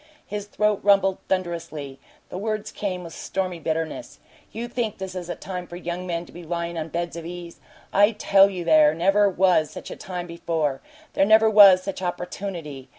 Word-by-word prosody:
His 205 0 -5
throat 210 0 +1
rumbled 195 -1 +3
thunderously; 165 -7 -3 0.3
the - - -6
words 215 0 -3
came 185 -3 -4
with 165 -1 -9
stormy 185 -2 -3
bitterness. 165 - -3 0.3
"You 235 +2 -5
think 235 -3 -3
this 190 -1 -6
is 180 -2 -6
a - - -3
time 180 -2 -6
for 175 - -9
young 175 +1 -5
men 170 -1 -3
to - - -16
be 175 - -10
lyin' 170 +1 -3
on 160 -1 -3
beds 170 +1 -3
of 170 - -6
ease? 170 0 -8 0.3
I 205 +3 +5
tell 200 -2 +5
you 185 -3 -5
there 155 -2 +5
never 195 +4 +3
was 180 -5 +3
such - - -9
a - - -5
time 180 -2 -6
before; 165 -5 -2 0.3
there - - +3
never 220 +2 +5
was 195 -3 +8
such 195 -1 -5
opportunity. 175 -6 -5
180 Hz, 190 wpm, -24 LUFS, 170-195 Hz, 0.3 s, was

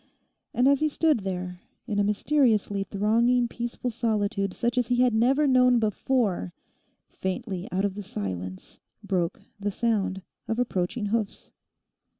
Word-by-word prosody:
And 250 +2 +3
as 280 -1 +4
he 310 - +2
stood 310 -3 +2
there 180 -2 -4 0.2
in 210 -4 -1
a - - +4
mysteriously 210 -2 +2
thronging 230 +5 +2
peaceful 240 +1 -4
solitude 210 -3 0
such 240 +5 0
as 245 - 0
he 245 - +2
had 250 -1 +3
never 260 +7 +3
known 250 -2 +5
before, 215 - 0 0.5
faintly 190 -1 -4
out 190 +2 +1
of 200 - -1
the 205 - -6
silence 95 - -5 0.2
broke 175 -3 -1 0.2
the 205 0 -1
sound 200 -3 -1 0.2
of 225 - -1
approaching 225 -2 -1
hoofs. 215 0 -2
215 Hz, 145 wpm, -26 LUFS, 195-245 Hz, 0.5 s, known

